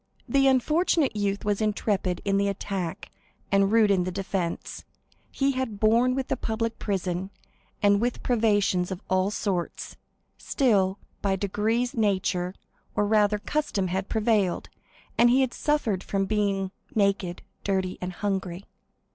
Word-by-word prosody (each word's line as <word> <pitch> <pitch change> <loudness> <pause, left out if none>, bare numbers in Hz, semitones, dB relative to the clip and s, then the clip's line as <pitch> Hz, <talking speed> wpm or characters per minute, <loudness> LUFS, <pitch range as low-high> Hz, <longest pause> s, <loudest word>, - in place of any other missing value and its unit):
The 275 -1 +3
unfortunate 300 +2 +2
youth 205 -1 -1
was 205 0 0
intrepid 205 -4 0
in 195 -1 +2
the 200 0 +2
attack, 195 -3 -4 0.4
and 195 0 +3
rude 220 -2 +5
in 185 -2 +3
the 185 - -2
defence. 185 -2 -3 0.5
He 275 0 +1
had 255 -6 -3
borne 235 +4 +4
with 265 -1 -2
the - - 0
public 225 0 -2
prison, 190 -2 -2 0.5
and 205 0 +4
with 245 +1 -1
privations 205 -6 +2
of 190 -1 -6
all 185 +1 +3
sorts; 195 -4 -3 0.4
still, 200 -7 +2 0.2
by 195 -1 +1
degrees 215 +5 0
nature, 185 -4 0 0.4
or 210 - +2
rather 210 0 +3
custom, 205 -6 -1
had 190 +2 -2
prevailed, 215 -5 +1 0.5
and 240 - +7
he 260 +2 +4
suffered 240 -12 0
from 195 -1 -1
being 195 -2 0 0.2
naked, 200 -4 0 0.2
dirty, 190 -2 -1
and 180 0 -3
hungry. 190 -2 -3
205 Hz, 140 wpm, -26 LUFS, 190-225 Hz, 0.5 s, and